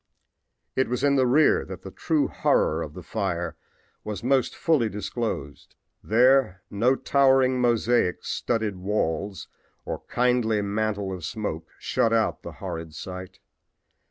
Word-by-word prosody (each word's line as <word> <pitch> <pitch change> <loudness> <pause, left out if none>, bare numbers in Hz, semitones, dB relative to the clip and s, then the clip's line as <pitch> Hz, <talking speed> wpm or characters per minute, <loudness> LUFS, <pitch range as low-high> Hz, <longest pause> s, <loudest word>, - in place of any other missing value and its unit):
It 130 - +1
was 125 +2 -2
in 140 -1 +4
the 130 -2 +3
rear 145 +5 +4
that 95 -2 -9
the 95 - -8
true 155 - 0
horror 80 +2 +1
of 75 -2 -6
the 90 - -8
fire 85 -4 -2 0.5
was 105 0 -5
most 130 +1 +2
fully 145 -9 +2
disclosed. 105 - -5 0.3
There 120 -4 +3
no 120 +6 +3
towering 130 -2 +3
mosaic 120 -5 +2
studded 110 -5 -1
walls 95 0 -2 0.4
or - - -4
kindly 120 -4 +1
mantle 100 -1 -1
of 90 -3 -7
smoke 85 -5 -4
shut 115 - +1
out 110 -1 +1
the - - -8
horrid 80 -1 -6
sight. 90 +3 -8
110 Hz, 135 wpm, -25 LUFS, 95-125 Hz, 0.5 s, in